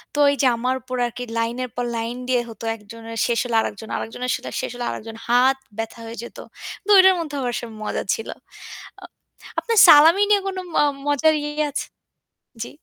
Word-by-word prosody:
তো - - -1
এই - - -1
যে 265 - +4
আমার 255 +2 0
উপর 255 +3 -6
আর 240 - -4
কি 250 - -4
লাইনের 240 +2 -2
পর 245 0 -2
লাইন 230 +2 -4
দিয়ে 250 -1 +2
হতো 225 0 -11
একজনের 225 +1 -10
শেষ 235 -1 +1
হলে 235 -2 -2
আরেকজন, 220 +1 -6
আরেকজনের 245 +2 -4
সাথে - - -7
শেষ - - -4
হলে 245 0 -4
আরেকজন। 225 +1 -8
হাত 255 +3 +4 0.2
ব্যথা 225 +1 -5
হয়ে 230 0 -8
যেত। - - -11 0.4
কিন্তু 420 - -2
ওইটার 380 0 +7
মধ্যেও 295 -4 -4
আসলে 235 0 -4 0.2
মজা - - -2
ছিল। 225 - -5 0.7
আ - - -12 0.6
আপনার 455 -3 +1
সালামি 325 +5 +8
নিয়ে 405 -1 +4
কোন 380 -1 -4 0.2
ম - - -6 0.3
মজার 290 +2 +3
ইয়ে 295 +1 -2
আছে? 280 - -3 0.8
জি। - - -8
245 Hz, 190 wpm, -22 LUFS, 230-295 Hz, 0.8 s, সালামি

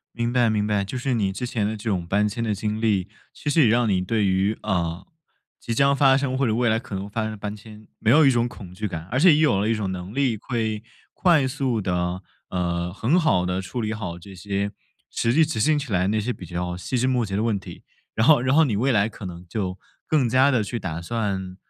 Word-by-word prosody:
明 120 0 -1
白 120 -2 +3
明 105 -1 0
白。 105 -2 +1
就 125 +6 -5
是 130 0 -1
你 100 -4 0
之 125 +5 -4
前 110 -4 -1
的 110 +1 -2
这 110 +2 -6
种 90 -4 -1
搬 105 +4 +2
迁 115 +3 -4
的 110 -2 0
经 105 +2 -3
历， 105 -4 +1 0.2
其 145 - -4
实 155 +1 +4
也 - - +5
让 120 +1 +3
你 95 -3 +2
对 105 +3 0
于， 95 +3 +1
呃， 90 -4 -2 0.5
即 115 - -3
将 140 +3 +4
发 135 -2 +5
生 135 -1 -1
或 135 -1 +1
者 110 - +1
未 120 +1 +2
来 110 0 +2
可 115 -3 -8
能 95 +1 -4
发 110 +2 -3
生 110 - -2
的 110 - -7
搬 105 0 -5
迁 105 0 -13
没 115 - +1
有 150 +4 +6
一 - - +7
种 120 -1 +1
恐 95 -6 -11
惧 105 +2 -3
感， 80 -3 -6
而 125 - 0
且 170 -1 +7
也 - - +2
有 145 -11 +3
了 105 - 0
一 115 - +2
种 105 -3 -2
能 90 +3 -7
力 130 -5 +1
会 110 -2 -3 0.3
快 165 -7 +3
速 130 -4 -1
地， 90 0 -2 0.3
呃， 85 -1 -2
很 120 - +1
好 95 - +2
地 90 +1 -1
处 95 +6 -5
理 110 -1 -2
好 95 -6 -5
这 95 +3 -12
些 100 +2 -2 0.4
实 115 - 0
际 160 +5 +5
执 150 -8 -3
行 155 +6 +3
起 140 -6 -5
来 90 0 +2
那 110 +1 +1
些 125 +4 -2
比 90 - -10
较 90 +1 -4
细 110 +8 -3
枝 125 - +1
末 125 -2 +1
节 95 -1 -3
的 105 - 0
问 110 -3 +1
题。 95 - -11 0.3
然 110 - +2
后 150 -4 +6
然 130 +3 +2
后 160 - +6
你 120 -8 0
未 130 +6 +1
来 105 -3 +3
可 105 -2 -9
能 90 0 -9
就 95 -2 -3 0.3
更 145 -6 +2
加 130 +4 +4
地 120 -6 +1
去 110 - -4
打 85 -2 -4
算 95 -2 -3
110 Hz, 280 characters per minute, -24 LUFS, 95-125 Hz, 0.5 s, 一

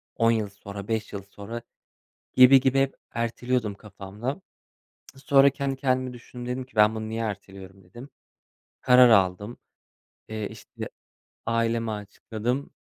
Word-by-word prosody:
10 115 0 +3
yıl 110 -3 0
sonra 100 0 -9
5 110 -2 -2
yıl 100 -1 -5
sonra 100 +4 -8 0.7
gibi, 130 +1 +8
gibi, 130 +1 +2
hep 135 0 +1 0.2
erteliyordum 115 -1 -1
kafamda. 105 - -6 0.7
Sonra 135 0 +5
kendi 140 0 -3
kendimi 130 -1 0
düşündüm. 120 0 -10
Dedim 130 - -4
ki 130 - -27
ben 105 +1 +5
bunu 110 0 -4
niye 115 +1 -3
erteliyorum 95 -2 -7
dedim. 120 +10 -12 0.7
Karar 125 0 +7
aldım. 100 +2 +2 0.7
Eee, 110 -1 -4
işte - - -9 0.6
aileme 115 -1 0
açıkladım. 110 +5 -4
115 Hz, 130 wpm, -26 LUFS, 105-125 Hz, 0.7 s, gibi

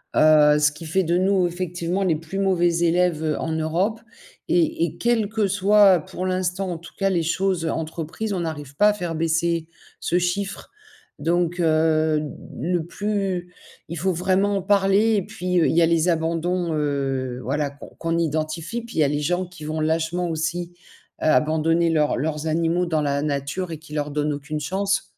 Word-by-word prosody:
heu, 150 -1 +6
ce 150 0 +4
qui 155 +3 -10
fait 185 +5 +1
de 170 +1 +1
nous, 185 -1 +2
effectivement 175 +1 -2
les 175 -4 +2
plus 165 +5 -6
mauvais 175 -3 +2
élèves 165 -3 +1
en 160 - -2
Europe. 165 +8 0 0.5
Et 170 -1 +2
et 165 - -7
quel 230 -3 +1
que 215 -2 0
soit, 200 -1 +5
pour 185 - -5
l'instant, 185 0 -1
en 170 - -4
tout 170 +1 -13
cas, 195 0 +1
les 175 -3 +1
choses 185 +1 0
entreprises, 160 +6 -3
on 185 - -2
n'arrive 145 -4 -5
pas 210 +7 +5
à - - +2
faire 175 -5 -4
baisser 165 0 0 0.3
ce 175 - +1
chiffre 195 +3 -2 0.5
donc 175 +2 0
heu, 155 -1 +2
de 150 -1 -7
le 170 -2 0
plus 195 -2 -2 0.4
il 170 - -5
faut 185 +4 0
vraiment 190 +3 +1
en - - -2
parler 200 +3 +3
et 200 - +1
puis, 180 0 -1
heu, - - +4
il - - 0
y 170 - +5
a 165 - +5
les 165 +1 +2
abandons, 170 +1 0
heu, 135 -4 -1
voilà 140 +4 -1
qu'on 140 - -12
qu'on 165 0 -1
identifie 160 +6 -2
puis, 235 -4 -10
il - - +2
y - - +6
a - - +3
les 145 +1 -1
gens 180 +5 -1
qui 175 -3 -13
vont 155 +1 -3
lâchement 165 +3 0
aussi, 170 +2 -3 0.5
heu, - - 0
abandonner 160 +4 +3
leurs 155 -2 +2
leurs 150 +3 -2
animaux 165 +2 +1
dans 160 -3 0
la 140 -1 0
nature 145 +5 -2
et 160 - -6
qui 155 -1 -13
leur 150 -1 -2
donne 150 +1 0
aucune 145 +2 -4
chance. 195 +6 0
170 Hz, 195 wpm, -23 LUFS, 155-185 Hz, 0.5 s, heu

